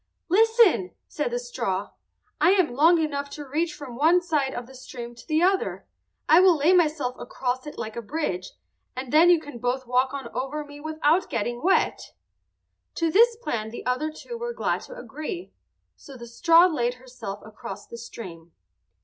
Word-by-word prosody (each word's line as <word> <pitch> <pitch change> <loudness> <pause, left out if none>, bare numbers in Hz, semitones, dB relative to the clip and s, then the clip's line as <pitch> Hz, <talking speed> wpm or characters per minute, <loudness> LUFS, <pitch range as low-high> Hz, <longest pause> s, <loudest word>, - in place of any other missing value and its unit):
"Listen!" 435 - +4
said 295 - -2
the 240 - -2
straw. 205 -5 -3 0.5
"I 340 +5 +5
am 365 -10 +2
long 325 +7 +5
enough 285 -3 -2
to 295 - -7
reach 315 +5 -1
from 275 -5 -9
one 320 +7 +4
side 305 -6 0
of 245 - -5
the 265 - -15
stream 245 -2 -9
to 235 - -15
the 315 +1 +2
other. 380 +1 +1 0.4
I 320 - +7
will 365 -3 +6
lay 305 +6 +4
myself 305 -7 +2
across 255 +2 -3
it 295 - -8
like 220 0 -5
a 235 - -4
bridge, 210 - -3 0.4
and 255 0 -6
then 330 +3 +7
you 350 -2 +6
can 290 -6 -10
both 250 +2 -1
walk 250 +2 +1
on 275 -3 -5
over 270 +5 -3
me 290 0 -12
without 315 +3 +1
getting 240 +2 -2
wet." 380 +3 +1 0.8
To 330 -1 0
this 465 +6 +5
plan 230 - -3
the 235 - -8
other 255 +5 0
two 470 +9 -8
were 475 0 -3
glad - - -1
to - - -9
agree, 345 - -7 0.4
so 275 -2 -13
the 235 - -9
straw 330 +9 +5
laid 245 -8 0
herself 245 -6 -8
across 210 -2 -9
the 235 - -10
stream. 175 -8 -10
285 Hz, 185 wpm, -25 LUFS, 240-330 Hz, 0.8 s, I